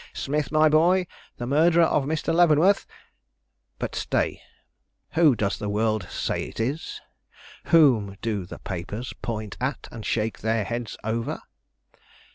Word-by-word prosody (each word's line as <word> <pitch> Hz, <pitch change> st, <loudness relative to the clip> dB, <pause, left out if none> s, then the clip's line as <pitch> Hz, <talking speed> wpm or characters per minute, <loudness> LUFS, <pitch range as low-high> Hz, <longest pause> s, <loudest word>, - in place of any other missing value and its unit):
Smith, 150 Hz, -2 st, -2 dB
my 155 Hz, 0 st, +5 dB
boy, 175 Hz, +5 st, +4 dB, 0.3 s
the 120 Hz, -, -4 dB
murderer 165 Hz, +6 st, +4 dB
of 150 Hz, -3 st, +2 dB
Mr. 155 Hz, +2 st, -1 dB
Leavenworth 175 Hz, +3 st, +4 dB, 0.9 s
but -, -, -4 dB
stay, -, -, -1 dB, 0.7 s
who 160 Hz, -6 st, +4 dB
does 100 Hz, -3 st, -1 dB
the 105 Hz, -, -3 dB
world 110 Hz, -2 st, 0 dB
say -, -, -2 dB
it -, -, -10 dB
is? 135 Hz, +8 st, -3 dB, 0.7 s
Whom 120 Hz, -12 st, +4 dB
do 105 Hz, -6 st, -3 dB
the -, -, -8 dB
papers 100 Hz, +7 st, -6 dB
point 110 Hz, -3 st, -4 dB
at 130 Hz, +1 st, -2 dB
and 115 Hz, -, -8 dB
shake 110 Hz, +1 st, -1 dB
their 110 Hz, 0 st, 0 dB
heads 120 Hz, +1 st, -4 dB
over? 115 Hz, +2 st, -3 dB
120 Hz, 135 wpm, -25 LUFS, 110-155 Hz, 0.9 s, my